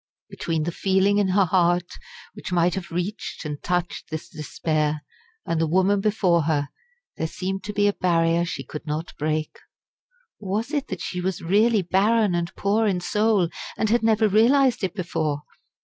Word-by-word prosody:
Between 165 -2 -2
the 170 - -2
feeling 195 +3 +2
in 200 - +2
her 190 +1 +3
heart 175 0 +2 0.5
which - - -8
might 175 0 +2
have 180 -3 -5
reached 180 +2 -4
and 150 -1 -5
touched 175 -1 -2
this 155 -1 -6
despair, 155 -2 -2 0.4
and 165 -1 0
the 165 - +2
woman 190 +4 +2
before 185 -6 +2
her, 145 -3 0 0.5
there 160 - -1
seemed 190 +3 -4
to 210 - -3
be 205 0 +3
a 205 - +2
barrier 170 -2 +2
she 175 - -4
could 150 - -8
not 155 +3 -4
break. 155 +1 -2 0.8
Or 195 -2 -5
was 225 +6 -1
it 290 -3 -1
that 190 - -5
she 180 - -3
was 185 0 -3
really 210 +4 +3
barren 205 +3 +2
and 170 0 -1
poor 215 +3 +1
in 190 -3 +1
soul, 210 -1 +1 0.3
and 220 -1 0
had 240 - +3
never 220 -1 +3
realised 240 +4 +4
it 190 0 -2
before? 155 -5 -2
185 Hz, 180 wpm, -24 LUFS, 165-205 Hz, 0.8 s, realised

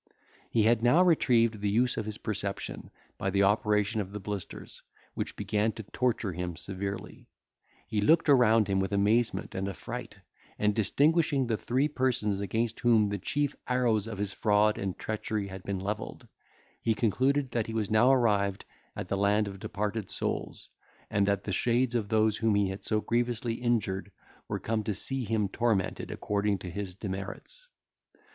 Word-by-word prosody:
He 115 - +2
had 115 +1 +3
now 125 +10 +5
retrieved 115 - +3
the 105 - +1
use 125 +5 +2
of 110 - -3
his 105 0 -4
perception 100 -3 -4 0.3
by 95 - 0
the 100 +1 +2
operation 105 +1 +2
of 100 0 -7
the 105 - -4
blisters, 100 -1 -7 0.3
which - - -4
began 105 +1 0
to 110 - -7
torture 115 -1 -1
him 90 0 -4
severely; 100 +2 -6 0.6
he 105 -2 -1
looked 160 +11 +4
around 115 -6 +5
him 95 -1 +1
with 95 +2 -1
amazement 105 +4 +1
and 95 +1 -2
affright, 90 -5 -7 0.4
and 105 0 +2
distinguishing 145 - +2
the 115 -2 0
three 130 +6 0
persons 125 -8 0
against 110 +3 -1
whom 115 -4 +4
the 100 0 -3
chief 145 +7 -1
arrows 120 -4 +1
of 110 -3 -5
his 100 0 -2
fraud 105 +1 +2
and 95 -2 -3
treachery 110 -1 -3
had 95 0 -8
been 100 +1 -3
levelled, 100 +3 -5 0.5
he 110 -1 +1
concluded 130 +5 +1
that 115 -3 -1
he 115 - -5
was 110 -2 -1
now 110 +4 +5
arrived 100 -6 +2 0.3
at - - -5
the - - -1
land 100 +1 +2
of 100 -1 -7
departed 105 +1 -3
souls, - - -3 0.4
and 100 -1 +2
that 100 -1 +1
the 100 - -4
shades 120 +4 +1
of 110 -4 -1
those 110 -1 +2
whom 110 -2 +2
he 100 -2 +2
had 95 +1 -6
so 110 -1 +1
grievously 120 0 0
injured 110 -5 -1 0.4
were - - -2
come 110 -1 -1
to 105 -1 -2
see 130 +5 -2
him 105 -1 0
tormented 110 -2 -1
according 105 0 -1
to 90 -1 -7
his 95 0 -5
demerits. 100 - -7
105 Hz, 175 wpm, -29 LUFS, 100-120 Hz, 0.6 s, now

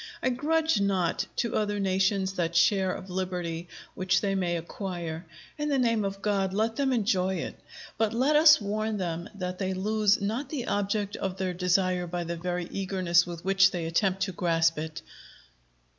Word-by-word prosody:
I - - +3
grudge 310 -1 +1
not 190 -4 0
to 235 -3 -1
other 205 -1 0
nations 190 0 +1
that 170 -2 -2
share 190 +2 +3
of 185 0 -7
liberty 180 -2 -3 0.3
which 185 -1 +1
they 200 -1 -1
may 175 -3 0
acquire: 170 -1 -5 0.3
in 295 0 -1
the 280 - +2
name 230 -4 +2
of 195 0 -4
God, 195 -2 0
let 220 +2 0
them 275 -2 +1
enjoy 195 -6 +1
it! 165 - -5 0.4
But 220 -2 +2
let 260 +6 +2
us 305 0 +8
warn 215 +1 -2
them 170 -2 -3
that 180 -2 -4
they 190 -1 -1
lose 210 +2 +2
not 225 +7 -2
the 275 -6 -3
object 205 0 -1
of 190 -1 -3
their 185 -1 -2
desire 180 0 +1
by 175 0 -3
the 170 0 -4
very 175 +1 -3
eagerness 185 -3 +1
with 170 0 -7
which 195 0 +5
they 175 -3 -4
attempt 190 +3 +1
to 190 - -2
grasp 165 -2 +1
it. 160 +1 -6
190 Hz, 180 wpm, -28 LUFS, 180-210 Hz, 0.4 s, us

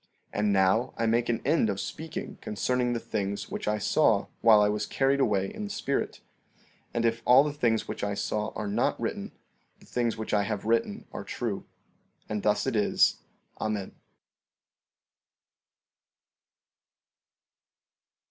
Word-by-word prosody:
14:30 - - -2
And 105 -1 +2
now 95 +5 +3
I 115 - 0
make 115 +2 +2
an 115 - 0
end 145 -6 +3
of 100 -1 -2
speaking 160 +9 -6
concerning 125 +3 0
the 120 - -1
things 100 -3 -3
which - - -4
I 105 0 +2
saw 105 - +3 0.2
while 110 -2 +7
I 105 - +5
was 105 0 -1
carried 135 +1 +2
away 100 -7 +1
in 215 - -5
the - - -6
spirit; 165 -9 -2 0.7
and 115 0 0
if 115 0 +1
all 125 +3 +7
the 150 -1 -2
things 120 -6 +1
which - - -5
I 100 0 -1
saw 105 +1 -1
are 105 - -3
not 100 - 0
written, - - -3 0.5
the - - -18
things 120 -2 -1
which 110 - -4
I 105 - +4
have 105 0 -3
written 115 -2 0
are - - -5
true. - - -4 0.6
And 105 -1 -2
thus 105 0 +2
it 130 -3 -1
is. 105 - +3 0.4
Amen. 105 -3 -2
110 Hz, 155 wpm, -28 LUFS, 105-120 Hz, 0.7 s, while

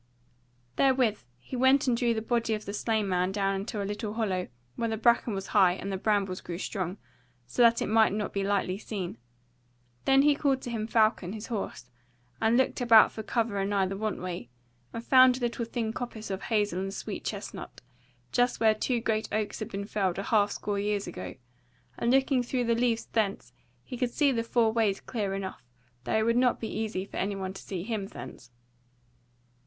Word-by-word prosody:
Therewith 255 - +2
he 125 - -8
went 260 +2 +4
and 250 -3 +2
drew 235 -1 +1
the 220 - -2
body 230 -1 0
of 215 - -7
the 200 - -5
slain 215 -1 0
man 180 0 +1
down 195 0 0
into 200 +1 -3
a - - -3
little 205 +1 -4
hollow 190 -5 -1 0.3
where 230 - -1
the 220 - -2
bracken 235 -1 +3
was 195 0 -5
high 190 -4 +6
and 195 +2 -5
the - - -1
brambles 195 -2 0
grew 170 - -6
strong, 185 -1 -3 0.5
so 125 - -1
that 235 -1 +5
it - - -2
might 220 -1 +4
not 210 0 -3
be 200 - -1
lightly 195 -1 0
seen. 185 - -5 0.9
Then 270 0 +5
he 295 0 +5
called 275 -2 0
to 245 - -5
him 220 -2 -2
Falcon, 215 -5 +2
his 215 0 -6
horse, 125 - -5 0.5
and 225 +2 +4
looked 260 0 +1
about 230 -3 +7
for 220 - -6
cover 220 -2 -1
anigh 195 0 +1
the 190 +1 -3
want 215 +1 -2
way, 175 -9 -5 0.4
and 230 0 -6
found 255 -1 +6
a - - -7
little 235 -1 -1
thin 225 -1 -3
coppice 225 -4 -6
of 190 - -3
hazel 205 -5 0
and 195 +1 -3
sweet - - -5
chestnut, - - -6 0.5
just 245 0 +2
where 220 -1 +5
two 235 +2 -1
great 220 -2 -1
oaks 215 -1 -2
had 215 - -5
been 200 +1 -4
felled 195 -4 -1
a 195 - -2
half 205 -1 +3
score 205 0 -3
years 205 0 -1
ago; 90 -1 -7 0.6
and 235 - +1
looking 265 0 +3
through 245 +1 -1
the 235 -1 +2
leaves 230 -1 +1
thence, 210 -3 -2 0.3
he 250 - -7
could 250 0 0
see 285 +3 +2
the 235 -3 0
four 230 -1 +2
ways 215 -4 +1
clearly 205 -5 -3
enough, 195 -1 -5 0.4
though - - +1
it 220 - +2
would 230 +1 +2
not 250 -1 +3
be 225 - -4
easy 215 -4 -2
for - - -9
anyone 195 -1 -2
to 195 - -9
see 180 -3 -5
him 210 -2 -3
thence. 125 -9 -10
215 Hz, 205 wpm, -28 LUFS, 195-235 Hz, 0.9 s, about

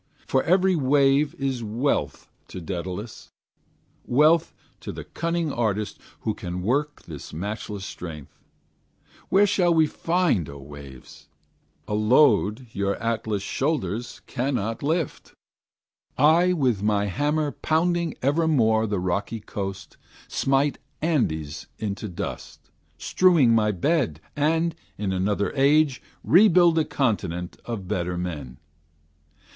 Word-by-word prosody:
For 130 - +2
every 185 +1 +3
wave 140 0 +3
is 135 -3 -2
wealth 115 +6 -1 0.2
to - - -8
Daedalus, 90 +5 -6 0.8
Wealth 155 +6 +4 0.3
to - - -6
the - - -7
cunning 170 -2 -2
artist 110 -3 -1 0.2
who 110 - -1
can 90 -2 -5
work 145 +7 -1
This 75 -5 -9
matchless 100 +3 -5
strength. 80 -8 -9 0.9
Where 195 +2 +5
shall 180 -4 +2
he 160 - +6
find, 165 - 0
O 70 - -9
waves! 70 -2 -12 0.6
A - - -3
load 110 0 +3
your 100 0 0
Atlas 110 -3 -2
shoulders 120 - -2
cannot 120 -4 -2
lift? 160 +1 -2 0.8
I 165 +6 +5
with 130 - +1
my 105 -1 +1
hammer 145 - 0
pounding 170 +1 0
evermore 130 -7 +2
The 100 -2 -1
rocky 100 +5 -2
coast, 100 -1 -6 0.3
smite 135 +1 +1 0.2
Andes 80 - -1
into 105 0 -4
dust, 85 - -7 0.3
Strewing 165 - +4
my 105 -2 +3
bed, 110 - 0 0.2
and, 160 +3 +1 0.2
in 100 -2 -2
another 100 +2 0
age, 140 0 +3 0.2
Rebuild 175 -2 +5
a 155 - +1
continent 95 - -2
of 110 -6 -5
better 90 -2 -2
men. 75 -8 -5
115 Hz, 115 wpm, -25 LUFS, 100-155 Hz, 0.9 s, he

